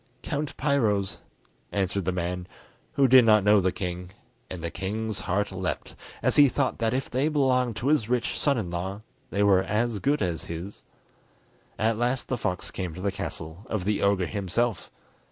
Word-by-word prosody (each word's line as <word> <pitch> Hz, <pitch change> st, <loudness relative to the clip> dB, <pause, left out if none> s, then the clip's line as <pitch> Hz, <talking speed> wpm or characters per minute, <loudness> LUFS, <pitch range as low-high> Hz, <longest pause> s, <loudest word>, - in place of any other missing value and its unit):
Count 150 Hz, -1 st, -3 dB
Piro's," 110 Hz, -10 st, +1 dB, 0.5 s
answered 95 Hz, -1 st, -1 dB
the 95 Hz, -, +1 dB
man, 90 Hz, 0 st, -3 dB, 0.5 s
who 140 Hz, -1 st, +4 dB
did 130 Hz, 0 st, +8 dB
not 110 Hz, -3 st, +5 dB
know 105 Hz, 0 st, +5 dB
the 95 Hz, 0 st, +2 dB
king; 90 Hz, -1 st, -4 dB, 0.4 s
and 90 Hz, -3 st, -6 dB
the 85 Hz, -, -2 dB
king's 110 Hz, +2 st, -3 dB
heart 100 Hz, +3 st, -1 dB
leapt 95 Hz, -1 st, -3 dB, 0.3 s
as -, -, +2 dB
he 145 Hz, -2 st, +8 dB
thought 135 Hz, +1 st, -1 dB
that 115 Hz, -1 st, +1 dB
if 130 Hz, +2 st, -1 dB
they 130 Hz, +4 st, 0 dB
belonged 130 Hz, -5 st, +2 dB
to 120 Hz, +6 st, -1 dB
his 145 Hz, -8 st, +2 dB
rich 125 Hz, -1 st, 0 dB
son 140 Hz, -3 st, +2 dB
in 95 Hz, -7 st, -3 dB
law 95 Hz, +4 st, -4 dB, 0.3 s
they 100 Hz, -, +1 dB
were 95 Hz, -2 st, +5 dB
as 105 Hz, +3 st, 0 dB
good 140 Hz, +2 st, +1 dB
as 85 Hz, -2 st, -2 dB
his. 85 Hz, +4 st, -7 dB, 0.9 s
At 110 Hz, +1 st, +1 dB
last 125 Hz, +2 st, 0 dB
the 130 Hz, -, 0 dB
fox 90 Hz, -4 st, -2 dB
came 90 Hz, -4 st, -4 dB
to 90 Hz, -, -7 dB
the 100 Hz, +1 st, 0 dB
castle 80 Hz, 0 st, -6 dB
of 105 Hz, -5 st, -2 dB
the 105 Hz, 0 st, 0 dB
ogre 100 Hz, -2 st, +2 dB
himself. 100 Hz, +3 st, -1 dB
105 Hz, 185 wpm, -27 LUFS, 95-120 Hz, 0.9 s, did